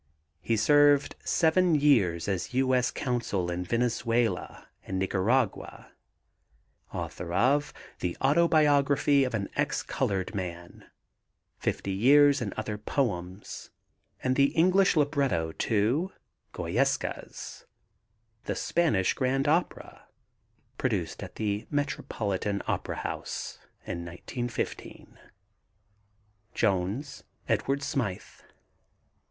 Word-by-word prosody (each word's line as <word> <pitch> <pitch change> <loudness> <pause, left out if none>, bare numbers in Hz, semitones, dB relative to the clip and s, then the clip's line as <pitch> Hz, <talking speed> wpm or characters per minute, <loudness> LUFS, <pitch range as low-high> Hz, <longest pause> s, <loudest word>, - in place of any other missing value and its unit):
He 115 - 0
served 145 +4 +4
seven 170 +1 +3
years 110 - +3
as 100 +5 -2
U. 130 0 +2
S. 125 -1 +3
Consul 115 -9 -2
in 90 +1 -2
Venezuela 115 +2 -1 0.2
and 95 - -4
Nicaragua. 100 +5 -1 1.0
Author 85 - -5
of 135 +9 +2 0.3
The 90 -1 -3
Autobiography 145 -2 +4
of 125 -3 -1
an 100 -2 -2
Ex - - 0
colored 95 0 -2
Man, 85 -3 -6 0.7
Fifty 100 - -2
Years 140 +7 +5
and 105 -4 -2
Other 105 -1 -4
Poems, 100 -6 -3 0.5
and 130 0 +1
the 140 - +5
English 185 +3 +4
libretto 140 - +1
to 120 - 0 0.4
Goyescas, - - -2 0.8
the - - -2
Spanish 145 - +1
grand 135 +2 0
opera, 165 +4 -1 0.7
produced - - -1
at - - -8
the 105 0 -2
Metropolitan 105 -8 -2
Opera - - -2
House - - -5 0.3
in 85 0 -4
1915. 115 +8 -6 1.4
JONES, 110 +8 -1 0.2
EDWARD 140 +1 0
SMYTH. 120 -9 -3
120 Hz, 95 wpm, -28 LUFS, 95-145 Hz, 1.4 s, Years